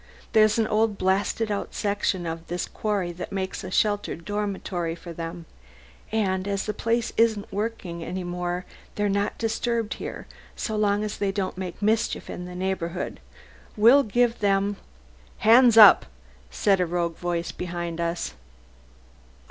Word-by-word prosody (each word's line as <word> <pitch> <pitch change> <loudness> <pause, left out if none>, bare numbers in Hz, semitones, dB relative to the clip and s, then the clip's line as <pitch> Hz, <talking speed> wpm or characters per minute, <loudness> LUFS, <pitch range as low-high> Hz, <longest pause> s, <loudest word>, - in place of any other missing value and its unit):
There's 215 0 +5
an 225 - +3
old 215 -1 +1
blasted 200 +4 0
out 200 - -3
section 200 -3 -1
of 165 0 -5
this 175 +1 -2
quarry 200 -5 -2
that 175 +1 -7
makes 190 -1 -3
a 185 - -5
sheltered 205 -4 0
dormitory 195 -5 -2
for 170 0 -9
them, 165 +1 -6 0.7
and 190 -3 0
as 200 -1 -1
the 210 - -2
place 230 +2 -1
isn't 220 -3 +2
worked 220 +1 -3
any 175 +1 -5
more 175 0 -3 0.3
they're 205 0 +1
not 200 0 0
disturbed 230 0 -1
here - - -7 0.3
so 220 - -3
long 205 -1 +2
as 210 -1 -4
they 200 -1 +1
don't 195 -1 -2
make 185 +1 -6
mischief 220 +1 0
in 180 - -6
the 180 0 -8
neighbourhood. 185 -1 -3 0.6
We'll 235 +7 +7
give 240 0 +1
them...." 200 0 +1 0.6
"Hands 235 +1 +6
up!" 210 -3 +9 0.4
said 195 - +2
a 180 - +1
rough 170 0 0
voice 170 0 -3
behind 170 -1 -4
us. 170 - -2
195 Hz, 150 wpm, -25 LUFS, 175-215 Hz, 0.7 s, up